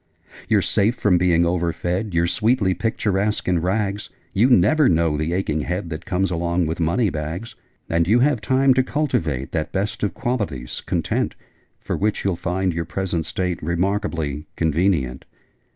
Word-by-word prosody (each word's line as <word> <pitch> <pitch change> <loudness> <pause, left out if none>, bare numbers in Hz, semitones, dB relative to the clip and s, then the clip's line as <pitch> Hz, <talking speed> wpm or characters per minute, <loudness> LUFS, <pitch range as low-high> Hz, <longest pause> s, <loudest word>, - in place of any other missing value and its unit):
'You're - - +3
safe 110 +5 +2
from 95 -7 +2
being 85 -1 +3
overfed: 90 +3 -1
You're 85 0 +3
sweetly 105 +1 +2
picturesque 105 0 -1
in 90 -2 +2
rags: 100 +3 -1 0.2
You 115 +7 +4
never 130 - +5
know 80 -2 +2
the 80 +2 -1
aching 85 -4 -1
head 85 +2 -3
That 80 +2 -6
comes 95 +1 0
along 85 0 0
with 80 +2 -3
money 90 +6 +1
bags: 80 +8 -5 0.3
And 85 0 +1
you 110 +5 +5
have 135 -4 +2
time 130 +4 +3
to 130 - +3
cultivate 80 - -1
That 80 -1 -2
best 105 +3 -2
of 105 - -1
qualities, 105 - -3
Content - - -1 0.4
For - - -3
which 105 0 -1
you'll 95 -3 +1
find 90 +1 -1
your 85 0 -2
present 85 -2 -2
state 90 -2 -2
Remarkably 85 -4 -1
convenient!' 80 -5 0
90 Hz, 160 wpm, -22 LUFS, 85-105 Hz, 0.4 s, never